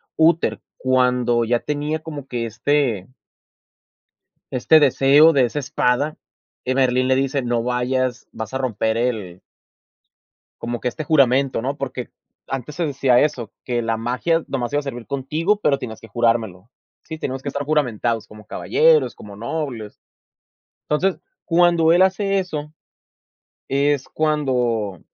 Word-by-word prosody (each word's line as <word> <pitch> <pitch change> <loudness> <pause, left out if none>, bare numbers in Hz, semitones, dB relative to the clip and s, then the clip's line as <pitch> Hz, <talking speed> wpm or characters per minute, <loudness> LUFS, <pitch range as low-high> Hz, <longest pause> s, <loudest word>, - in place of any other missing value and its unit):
Úter, 165 +1 +2 0.2
cuando 125 -2 +2
ya 120 +1 +1
tenía 150 +3 -2
como 150 -4 -8
que 120 -2 -3
este 120 -2 -1 1.4
este 155 +5 +4
deseo 145 +3 +5
de 135 -4 +4
esa 120 - -5
espada, 145 +1 0 0.5
que 130 +1 -1
Merlín 130 -1 +2
le 130 - +3
dice: 135 +1 0
"No 120 -2 -1
vayas, 125 +1 -1
vas 110 +1 -7
a - - 0
romper 110 -3 -1
el" 110 -7 -2 1.2
"como 120 0 -3
que - - -2
este 155 +6 -4
juramento, 135 -4 +3
¿no?". 135 +4 -3
Porque 130 -2 -5 0.4
antes 135 +2 -5
se 175 - -1
decía 135 -4 +3
eso, 120 -7 -1
que 120 -2 -1
la 115 -1 -1
magia 125 +9 0
nomás 125 -1 -3
iba 145 - +2
a - - -6
servir 120 -4 -7
contigo, 155 +9 -1
pero 140 -7 +2
tenías 110 -3 -7
que 115 - -12
jurármelo. 110 -3 -1 0.3
Sí, 160 - -7
tenemos 135 -3 -4
que 140 - -3
estar 140 +1 -3
juramentados, 120 -6 0
como 105 -1 -14
caballeros, 460 - +2
como 100 -1 -11
nobles. 120 -2 -5 0.9
Entonces, 180 +5 0 0.2
cuando 170 -1 +4
él 175 +2 +5
hace 195 +1 +2
eso, 155 -5 -4 1.0
es 140 0 +1
cuando 125 - 0
130 Hz, 145 wpm, -21 LUFS, 120-150 Hz, 1.4 s, deseo